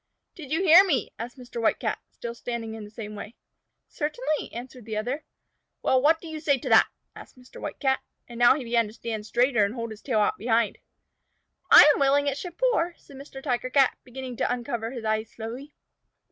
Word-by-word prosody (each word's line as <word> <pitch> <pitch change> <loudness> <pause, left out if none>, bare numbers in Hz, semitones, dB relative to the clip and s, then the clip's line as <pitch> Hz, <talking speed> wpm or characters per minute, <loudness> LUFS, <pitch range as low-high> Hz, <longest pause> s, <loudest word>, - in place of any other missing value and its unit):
"Did 295 -5 -11
you 325 +5 +1
hear 355 +1 +9
me?" 290 - 0
asked 240 +3 -6
Mr. 245 -2 -7
White 225 - +2
Cat, - - -2
still 235 -1 -7
standing 235 -1 -5
in 220 -1 -7
the - - -12
same 210 -1 -8
way. 210 +2 -9 0.5
"Certainly," 310 +2 -3
answered 245 0 -9
the 220 -1 -4
other. 250 +8 -3 0.6
"Well, 260 -1 +3
what 320 +3 +4
do 335 - -10
you 315 -1 -6
say 290 -3 +2
to - - -6
that?" - - +6 0.3
asked - - -13
Mr. 250 0 -14
White - - -6
Cat, 265 -2 +1 0.3
and 235 -1 -9
now 240 +1 +6
he 280 - -4
began 230 -1 +1
to 210 - -11
stand 220 -2 -5
straighter 245 -1 +2
and 200 +4 -1
hold 230 -2 -5
his 215 - -10
tail 235 -6 0
out 210 - +1
behind. 225 0 +1 0.9
"I - - +11
am - - -3
willing 280 +1 +3
it 280 -1 0
should 355 -2 -8
pour," 355 -9 +1
said 280 - -16
Mr. 270 -1 -10
Tiger 255 -2 -1
Cat, 270 +1 +3
beginning 255 -1 -8
to - - 0
uncover 240 -2 -3
his 240 -3 -7
eyes 220 0 -1
slowly. 240 +7 -8
245 Hz, 215 wpm, -26 LUFS, 230-285 Hz, 0.9 s, I